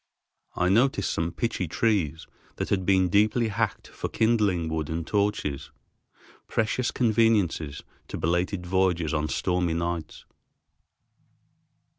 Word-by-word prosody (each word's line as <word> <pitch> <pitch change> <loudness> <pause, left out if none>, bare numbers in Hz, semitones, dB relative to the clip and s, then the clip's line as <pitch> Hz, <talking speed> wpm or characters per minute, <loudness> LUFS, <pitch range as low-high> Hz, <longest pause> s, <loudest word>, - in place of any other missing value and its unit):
I 90 - +1
noticed 115 0 +2
some 85 +1 -1
pitchy 95 -1 -2
trees 80 -6 0 0.3
that - - -3
had 95 -2 0
been 95 -1 +4
deeply 110 +5 +2
hacked 110 +1 -2
for - - -5
kindling 105 -7 +1
wood 80 -2 -2
and 80 0 -3
torches, 100 -9 -1 0.8
precious 115 +3 0
conveniences 110 - +1 0.2
to - - -5
belated 90 +3 -1
voyagers 90 -3 +1
on 75 -1 0
stormy 90 -2 0
nights. 85 -2 -4
90 Hz, 115 wpm, -26 LUFS, 85-105 Hz, 0.8 s, been